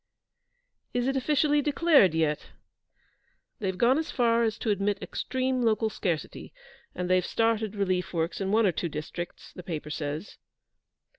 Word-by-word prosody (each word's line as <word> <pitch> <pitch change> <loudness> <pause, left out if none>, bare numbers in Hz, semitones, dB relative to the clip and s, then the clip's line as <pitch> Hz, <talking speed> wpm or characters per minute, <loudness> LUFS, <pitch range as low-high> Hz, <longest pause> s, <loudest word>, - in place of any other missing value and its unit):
'Is 245 +1 +1
it 270 - 0
officially 295 +2 +2
declared 290 - +4
yet?' 155 -2 0 1.1
'They've 190 -3 -2
gone 255 +7 +4
as 320 - -3
far 235 -2 +2
as 225 -2 0
to 220 - -1
admit 200 0 0
extreme 260 +1 -2
local 220 -1 +2
scarcity, 170 -8 -3 0.4
and 180 0 -2
they've 185 0 +3
started 225 0 0
relief 185 -3 0
works 170 +2 -2
in 195 0 -1
one 220 +1 +4
or 190 - +4
two 170 +1 -3
districts, 155 +3 -7
the - - -8
paper 155 -4 -5
says.' 150 +4 -5
205 Hz, 150 wpm, -28 LUFS, 175-245 Hz, 1.1 s, declared